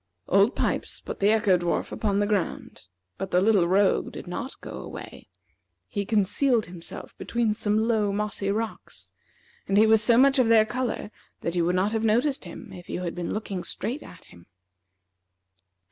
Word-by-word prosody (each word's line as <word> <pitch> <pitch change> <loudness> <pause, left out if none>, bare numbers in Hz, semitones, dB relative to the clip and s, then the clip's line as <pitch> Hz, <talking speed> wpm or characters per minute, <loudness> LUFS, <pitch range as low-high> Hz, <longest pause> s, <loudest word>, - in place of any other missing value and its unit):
Old 200 +5 +4
Pipes - - -2
put - - -7
the 200 - +4
Echo 210 -4 +3
dwarf 175 0 -1
upon 205 -2 -1
the 205 - +2
ground, 205 - -3 0.3
but 195 0 -3
the 180 - +3
little 195 -3 +4
rogue 195 +2 +2
did - - -8
not 190 +9 -6
go - - -8
away. - - -9 0.6
He 200 -1 -3
concealed 225 +3 +2
himself 170 -1 -10
between 235 -2 0
some 210 -1 0
low, 220 -2 +1
mossy 205 -1 -2
rocks, 220 +2 -4 0.6
and 195 - +2
he 215 - +7
was 220 -1 +5
so 230 +2 +4
much 270 +2 +5
of 250 - +4
their 225 -1 +6
color 240 -2 -3 0.3
that 170 - -3
you 175 - +2
would 180 +1 +1
not 190 +3 +1
have 225 0 -1
noticed 240 +4 +1
him 170 - -10
if 175 -1 -11
you 180 - -3
had 170 - -3
been 175 -1 -4
looking 200 -4 -4
straight 235 +10 -3
at 180 - -13
him. 85 - -17
210 Hz, 180 wpm, -26 LUFS, 185-225 Hz, 0.6 s, he